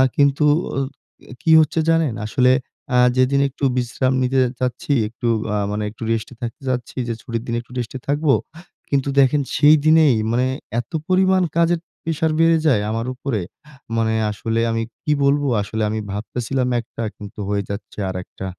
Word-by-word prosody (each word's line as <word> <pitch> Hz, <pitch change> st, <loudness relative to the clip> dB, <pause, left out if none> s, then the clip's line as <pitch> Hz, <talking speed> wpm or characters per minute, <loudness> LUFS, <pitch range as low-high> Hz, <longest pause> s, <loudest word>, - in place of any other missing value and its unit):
কিন্তু 140 Hz, +1 st, +3 dB, 0.3 s
আ -, -, +2 dB, 0.5 s
অ -, -, -8 dB
কি 160 Hz, -, +2 dB
হচ্ছে 155 Hz, +2 st, 0 dB
জানেন? 165 Hz, -7 st, +2 dB
আসলে 125 Hz, +3 st, +3 dB, 0.4 s
আ -, -, +5 dB, 0.2 s
যেদিন 130 Hz, +2 st, +3 dB
একটু 140 Hz, -, -13 dB
বিশ্রাম 130 Hz, +2 st, 0 dB
নিতে 130 Hz, +1 st, +1 dB
যে 125 Hz, -, 0 dB
যাচ্ছি, 125 Hz, +3 st, -1 dB
একটু 115 Hz, +2 st, -5 dB, 0.3 s
আ -, -, +1 dB
মানে 105 Hz, +1 st, -2 dB
একটু 115 Hz, -, -10 dB
রেস্টে 115 Hz, +2 st, -2 dB
থাকতে 120 Hz, +5 st, -5 dB
চাচ্ছি 125 Hz, -1 st, -3 dB
যে, 115 Hz, -, -1 dB
ছুটির 115 Hz, -1 st, -4 dB
দিন 115 Hz, -, -1 dB
একটু 120 Hz, -, -21 dB
রেস্টে 120 Hz, +2 st, -5 dB
থাকবো। 145 Hz, 0 st, +2 dB, 0.6 s
কিন্তু 140 Hz, 0 st, +1 dB
দেখেন 140 Hz, +2 st, +4 dB
সেই 150 Hz, +1 st, +7 dB
দিনেই 155 Hz, -5 st, +6 dB, 0.2 s
মানে 125 Hz, +2 st, +2 dB, 0.3 s
এত 120 Hz, -, -7 dB, 0.2 s
পরিমাণ 185 Hz, 0 st, +3 dB
কাজের 170 Hz, 0 st, +3 dB, 0.3 s
প্রেশার 160 Hz, 0 st, 0 dB
বেড়ে 165 Hz, 0 st, +5 dB
যায় 115 Hz, -8 st, +3 dB
আমার 115 Hz, +2 st, -2 dB
উপরে। 125 Hz, -6 st, -2 dB, 0.6 s
মানে 110 Hz, -1 st, +1 dB, 0.2 s
আসলে 115 Hz, +2 st, -2 dB
আমি 115 Hz, 0 st, -1 dB, 0.2 s
কি 150 Hz, -, 0 dB
বলবো 145 Hz, +1 st, +2 dB
আসলে? 110 Hz, +2 st, -3 dB
আমি 110 Hz, +1 st, -2 dB
ভাবতেছিলাম 125 Hz, +5 st, -2 dB
একটা, 115 Hz, 0 st, -7 dB
কিন্তু 105 Hz, +1 st, -10 dB
হয়ে 100 Hz, -1 st, 0 dB
যাচ্ছে 100 Hz, +1 st, -7 dB
আরেকটা। 95 Hz, +1 st, -6 dB
125 Hz, 170 wpm, -21 LUFS, 115-145 Hz, 0.6 s, সেই